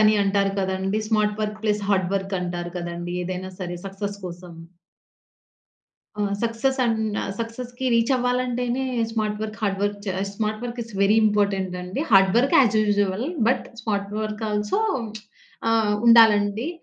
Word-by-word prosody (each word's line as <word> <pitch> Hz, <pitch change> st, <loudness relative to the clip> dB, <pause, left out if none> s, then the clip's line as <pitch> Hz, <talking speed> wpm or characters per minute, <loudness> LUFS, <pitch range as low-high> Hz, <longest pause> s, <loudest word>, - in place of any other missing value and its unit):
అని 215 Hz, 0 st, +5 dB
అంటారు 195 Hz, 0 st, +1 dB
కదండీ! 190 Hz, +2 st, -1 dB
Smart 210 Hz, -1 st, +1 dB
work 210 Hz, 0 st, -3 dB
plus 210 Hz, -1 st, +1 dB
hard 190 Hz, -3 st, +2 dB
work 195 Hz, 0 st, -2 dB
అంటారు 175 Hz, -1 st, -4 dB
కదండీ! 175 Hz, 0 st, -5 dB
ఏదైనా 185 Hz, +1 st, -5 dB
సరే, 175 Hz, -1 st, -4 dB
సక్సెస్ 200 Hz, +1 st, -5 dB
కోసం. 175 Hz, 0 st, -9 dB, 1.7 s
ఆ -, -, +2 dB, 0.2 s
సక్సెస్ 235 Hz, +4 st, 0 dB
అన్ 230 Hz, -1 st, +1 dB, 0.4 s
సక్సెస్‌కి 245 Hz, +2 st, -5 dB
reach 230 Hz, +2 st, +2 dB
అవ్వాలంటేనే, 250 Hz, 0 st, 0 dB, 0.3 s
smart 215 Hz, -2 st, -1 dB
work, 215 Hz, 0 st, -5 dB
hard 195 Hz, -2 st, 0 dB
work 205 Hz, 0 st, -1 dB
చే -, -, 0 dB, 0.2 s
smart 215 Hz, 0 st, -2 dB
work 240 Hz, 0 st, -5 dB
is 230 Hz, 0 st, -12 dB
very 205 Hz, +2 st, +4 dB
important 200 Hz, -3 st, 0 dB
అండి. 180 Hz, +9 st, -4 dB
Hard 195 Hz, -2 st, +6 dB
work 260 Hz, +3 st, +3 dB
as 225 Hz, -5 st, +4 dB
usual. 205 Hz, 0 st, +1 dB, 0.2 s
But, 255 Hz, -, +1 dB, 0.2 s
smart 200 Hz, -3 st, -2 dB
work 215 Hz, 0 st, -4 dB
also 210 Hz, -, 0 dB, 0.9 s
ఆహ్, 220 Hz, -2 st, +2 dB
ఉండాలండి. 225 Hz, +2 st, +5 dB
210 Hz, 145 wpm, -23 LUFS, 195-230 Hz, 1.7 s, hard